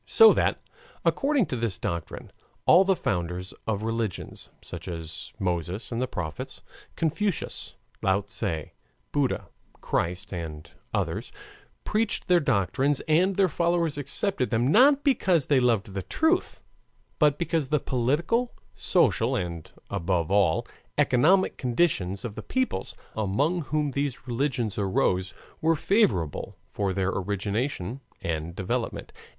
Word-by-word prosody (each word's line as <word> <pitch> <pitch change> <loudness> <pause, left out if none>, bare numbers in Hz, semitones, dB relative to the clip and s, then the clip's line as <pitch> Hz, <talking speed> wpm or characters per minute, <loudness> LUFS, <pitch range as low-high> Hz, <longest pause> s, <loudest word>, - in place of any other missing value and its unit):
So 450 0 +8
that, - - +1 0.5
according 280 -5 +2
to 130 - -4
this 115 -6 -2
doctrine, 85 -1 -5 0.3
all 185 - +7
the 195 0 +3
founders 90 - -2
of 105 -1 -1
religions, 115 -3 -3
such - - -8
as 80 -2 -6
Moses 90 +4 -2
and 115 +1 -1
the 130 - 0
prophets, 80 -7 -6 0.3
Confucius, 165 +4 -1 0.3
Lao 95 +1 +2
Tse, 95 -5 -3 0.4
Buddha, 145 -3 0 0.3
Christ, 90 +3 -2
and 80 -2 -6 0.2
others, - - -2 0.5
preached 215 -2 0
their 180 -1 +5
doctrines 135 - +1
and 180 +5 +2
their 195 0 +4
followers 170 -2 +1
accepted 140 +1 0
them, 120 +2 +2
not 275 - +6
because 185 - +3
they 140 -3 +4
loved 115 -5 +1
the 95 - -2
truth, 320 - 0 0.6
but 150 -2 +4
because 165 -4 0
the 150 +2 +2
political, 155 - 0 0.2
social, - - +2
and 85 -3 -4 0.2
above 85 0 0
all 95 -5 +3 0.3
economic 165 +10 +4
conditions 120 - 0
of 115 - -4
the - - -6
peoples 260 - -2 0.2
among 140 - +1
whom 150 -1 0
these 140 -1 -2
religions 120 -4 -1
arose 95 -1 +1 0.3
were 165 +1 +3
favorable 120 - +1
for 100 -2 -1
their 95 0 0
origination 100 +5 -2 0.2
and 80 +1 -3
development. 115 +6 -3
120 Hz, 130 wpm, -27 LUFS, -, 0.6 s, So